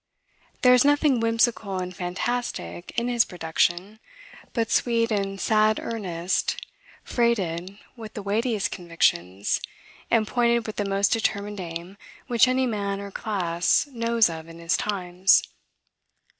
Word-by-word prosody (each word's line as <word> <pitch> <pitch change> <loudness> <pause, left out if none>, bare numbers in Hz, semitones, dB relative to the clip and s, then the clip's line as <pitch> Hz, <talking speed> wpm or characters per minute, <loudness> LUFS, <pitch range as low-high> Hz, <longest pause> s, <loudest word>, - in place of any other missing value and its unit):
There 250 0 +7
is 250 - +6
nothing 290 -2 +3
whimsical 230 -3 +1
and 180 0 -4
fantastic 180 - -3
in 235 +1 +1
his 240 -1 +3
production, 175 +4 -1 0.5
but 230 -2 -1
sweet 230 -1 +2
and 195 -2 -1
sad 215 0 +3
earnest, 185 -6 -2 0.5
freighted 195 -6 -1 0.2
with 225 -3 -10
the 210 - -5
weightiest 215 +1 0
convictions, 100 - 0 0.5
and 225 -2 +2
pointed 235 -1 +2
with 215 - -6
the 205 -1 -1
most 195 +1 +2
determined 205 -3 -1
aim 170 +2 -7 0.3
which 240 -1 +4
any 260 +1 +2
man 200 -4 -2
or 200 0 -7
class 180 -5 0
knows 230 -2 +2
of 160 -1 -7
in 165 0 -11
his 170 0 0
times. 185 -2 +2
205 Hz, 130 wpm, -25 LUFS, 180-230 Hz, 0.5 s, There